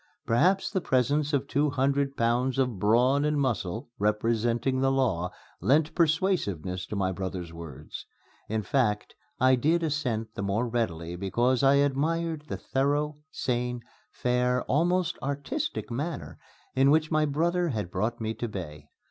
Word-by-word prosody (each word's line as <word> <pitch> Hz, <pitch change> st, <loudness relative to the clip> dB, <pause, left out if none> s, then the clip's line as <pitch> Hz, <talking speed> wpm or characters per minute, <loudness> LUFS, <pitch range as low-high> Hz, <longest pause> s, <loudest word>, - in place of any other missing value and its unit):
Perhaps 180 Hz, +12 st, +2 dB
the 190 Hz, -2 st, 0 dB
presence 145 Hz, +1 st, +1 dB
of 140 Hz, -2 st, 0 dB
two 145 Hz, +2 st, +1 dB
hundred 140 Hz, 0 st, 0 dB
pounds 120 Hz, +3 st, +1 dB
of 125 Hz, -7 st, 0 dB
brawn 125 Hz, +7 st, +3 dB
and 150 Hz, -1 st, +1 dB
muscle, 120 Hz, -6 st, -2 dB
representing 115 Hz, +4 st, +1 dB
the 135 Hz, 0 st, +3 dB
law, 110 Hz, -10 st, +1 dB, 0.3 s
lent 150 Hz, +3 st, +3 dB
persuasiveness 150 Hz, -, 0 dB
to -, -, -5 dB
my 95 Hz, -2 st, 0 dB
brother's 90 Hz, -2 st, -5 dB
words. 80 Hz, -5 st, -9 dB, 0.4 s
In 110 Hz, 0 st, -1 dB
fact, 105 Hz, -1 st, 0 dB, 0.3 s
I 130 Hz, +1 st, +5 dB
did 160 Hz, +7 st, +2 dB
assent 130 Hz, -8 st, -1 dB
the -, -, -5 dB
more 100 Hz, +5 st, 0 dB
readily 85 Hz, -8 st, -2 dB
because 120 Hz, +7 st, +1 dB
I 135 Hz, 0 st, +5 dB
admired 150 Hz, +3 st, 0 dB
the -, -, -4 dB
thorough, 145 Hz, +2 st, 0 dB
sane, 125 Hz, -3 st, -2 dB, 0.3 s
fair, 125 Hz, 0 st, 0 dB
almost 175 Hz, +5 st, +1 dB
artistic 135 Hz, -5 st, -3 dB
manner 145 Hz, +8 st, -4 dB, 0.3 s
in 135 Hz, +1 st, +4 dB
which 155 Hz, +2 st, +3 dB
my 155 Hz, -1 st, +3 dB
brother 170 Hz, +4 st, +1 dB
had 105 Hz, -, -3 dB
brought 110 Hz, +6 st, -1 dB
me 110 Hz, 0 st, -2 dB
to 120 Hz, -, -4 dB
bay. 75 Hz, -8 st, -7 dB
130 Hz, 150 wpm, -28 LUFS, 110-145 Hz, 0.4 s, I